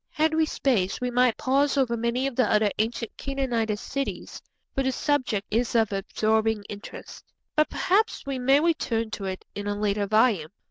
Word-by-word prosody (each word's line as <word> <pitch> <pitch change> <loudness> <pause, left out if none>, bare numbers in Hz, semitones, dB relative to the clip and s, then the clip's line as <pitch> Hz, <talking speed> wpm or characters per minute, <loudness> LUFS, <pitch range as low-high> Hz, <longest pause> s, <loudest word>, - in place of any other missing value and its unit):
Had 315 +1 +1
we 315 0 +2
space 220 -12 0
we 250 0 -2
might 250 -1 +3
pause 280 +2 +2
over 250 -4 +2
many 235 +3 -1
of 275 -3 -2
the 245 -5 +2
other 210 -1 +3
ancient 230 +1 -2
Canaanitish 240 -6 -1
cities, 275 +4 -5 0.3
for 270 - 0
the 265 0 +1
subject 255 -7 0
is 235 +2 0
of 225 -2 +3
absorbing 215 +2 0
interest, 205 +1 -9 0.3
but 305 0 +3
perhaps 420 +1 +1
we 275 -2 -3
may 270 +3 +4
return 235 -9 0
to 200 -2 -5
it 190 -1 -5
in 205 0 -5
a 205 - -1
later 205 -1 0
volume. 215 -6 +3
235 Hz, 180 wpm, -26 LUFS, 215-270 Hz, 0.3 s, may